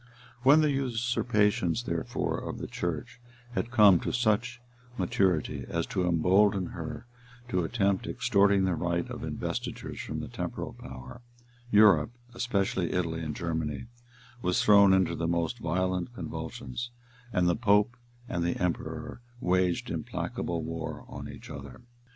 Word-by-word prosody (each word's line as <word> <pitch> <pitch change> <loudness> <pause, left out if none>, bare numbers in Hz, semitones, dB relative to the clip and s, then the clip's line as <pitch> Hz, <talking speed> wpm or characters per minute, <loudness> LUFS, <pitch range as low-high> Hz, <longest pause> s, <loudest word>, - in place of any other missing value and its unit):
When 140 +5 +7
the 150 -1 +3
usurpations, 115 -6 +1
therefore, 85 -7 -2
of - - -5
the - - -5
church 100 +9 -4 0.3
had 120 - -2
come 105 -7 +7
to - - -2
such 120 +1 +1 0.4
maturity 90 -3 +1
as - - -1
to 90 -1 +1
embolden 95 +3 +3
her - - -6 0.4
to 90 -6 +1
attempt 100 0 0
extorting 100 -4 +3
the 95 -1 +2
right 85 +1 -1
of - - -6
investitures - - -4
from - - -4
the - - -5
temporal - - -5
power, 65 - -10 0.5
Europe, 105 -8 +6 0.2
especially 100 -7 0
Italy 85 -3 -1
and 75 -2 -4
Germany, 80 -3 -2 0.6
was 90 0 +1
thrown 100 -2 +7
into 95 -3 +3
the 85 0 -2
most 85 +8 0
violent 90 +4 -1
convulsions, 70 - -5 0.4
and 90 -4 +2
the 85 - +3
pope 105 0 +3 0.3
and 85 - -1
the 85 - 0
emperor 90 +6 -3 0.2
waged 90 -2 +1
implacable 85 -2 -3
war 80 0 -5
on - - -7
each - - -10
other. 70 -3 -9
95 Hz, 140 wpm, -29 LUFS, 85-110 Hz, 0.6 s, When